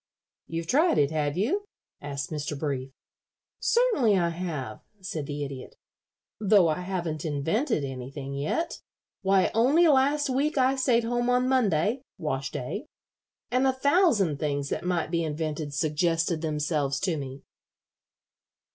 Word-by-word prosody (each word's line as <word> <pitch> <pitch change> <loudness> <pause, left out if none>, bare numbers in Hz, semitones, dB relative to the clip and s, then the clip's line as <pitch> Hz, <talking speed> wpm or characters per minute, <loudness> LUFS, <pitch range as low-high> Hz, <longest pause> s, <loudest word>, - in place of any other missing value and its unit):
"You've 165 0 -4
tried 310 - +3
it, 145 0 +3
have 150 0 -1
you?" 345 - 0 0.4
asked 140 0 -5
Mr. 150 -1 -3
Brief. 140 -3 -3 0.7
"Certainly 435 - +3
I 170 -2 +2
have," 165 -10 -4 0.2
said 170 -6 -5
the 145 0 -3
Idiot, 135 -2 -7 0.6
"though 200 -5 +5
I 155 - 0
haven't 175 -4 -3
invented 160 - 0
anything 135 +1 -6
yet. 155 - -2 0.4
Why, 190 -1 +3
only 280 +10 +4
last 290 +1 +3
week 280 +4 0
I 260 0 +3
stayed 250 -3 +2
home 240 +1 0
on 250 +1 +3
Monday 225 - +2 0.2
wash 135 -3 -2
day 130 - -5 0.6
and 255 +2 +3
a - - +4
thousand 260 - +3
things 145 -2 -1
that - - -3
might 175 -3 -1
be 170 -1 +1
invented 155 -1 -3
suggested 165 +2 0
themselves 150 -3 -1
to 180 -4 0
me." 135 -2 -7
170 Hz, 140 wpm, -27 LUFS, -, 0.7 s, though